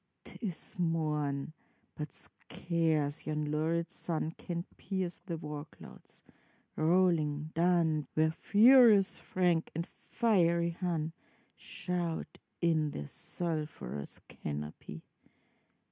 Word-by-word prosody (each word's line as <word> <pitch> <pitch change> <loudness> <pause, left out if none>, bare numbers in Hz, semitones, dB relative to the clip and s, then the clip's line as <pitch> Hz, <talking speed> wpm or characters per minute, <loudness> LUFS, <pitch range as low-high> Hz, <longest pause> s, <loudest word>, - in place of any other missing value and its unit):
'T - - -12
is 185 -3 -5
morn, 150 -4 0 0.4
but 150 -2 -6
scarce 160 -4 -2
yon 150 -1 -1
lurid 165 +3 0
sun 160 -4 -2
Can 170 0 -5
pierce 185 -3 -3
the 170 -3 -2
war 150 -1 -6
clouds, 155 - -15 0.5
rolling 155 -3 +2
dun, 165 -4 +2
Where 155 0 +3
furious 220 +2 +6
Frank 175 -3 +1
and 165 +1 -1
fiery 170 -9 +1
Hun 165 -2 -2 0.4
Shout 175 -2 -3 0.2
in 160 -3 +2
their 75 - -5
sulphurous 150 - -5
canopy. 75 +1 -6
165 Hz, 100 wpm, -32 LUFS, 150-175 Hz, 0.5 s, furious